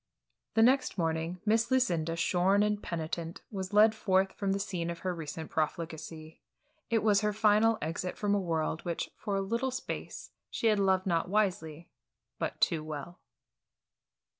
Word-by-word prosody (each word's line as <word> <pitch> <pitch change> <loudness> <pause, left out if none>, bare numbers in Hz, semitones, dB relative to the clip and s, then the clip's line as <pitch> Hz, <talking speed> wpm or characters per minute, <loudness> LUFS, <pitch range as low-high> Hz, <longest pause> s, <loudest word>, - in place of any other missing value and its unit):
The 225 - +6
next 260 -2 +3
morning, 165 +1 -1
Miss 225 +2 +2
Lucinda, 170 -11 +1
shorn 185 +4 +3
and 210 0 0
penitent, 165 0 -4
was 190 -3 -4
led 215 +1 +6
forth 190 -3 +1
from 195 -1 -1
the 195 - +1
scene 180 -4 -3
of 170 - -4
her 185 - +1
recent 160 -1 -6
profligacy. 160 0 -4 0.5
It 225 -2 +1
was 210 -2 +4
her 210 0 +1
final 215 +1 +4
exit 170 +4 -3
from 205 -1 0
a 205 - +3
world 165 -3 -1
which 170 -2 -3
for 200 - -3
a 195 - +1
little 230 +7 -1
space 260 0 -6 0.2
she - - -4
had 215 -2 +4
loved 190 -1 +2
not 170 -2 0
wisely 175 -6 -1 0.5
but - - -3
too 160 -2 +2
well. 155 +3 -7
185 Hz, 165 wpm, -30 LUFS, 165-210 Hz, 0.5 s, The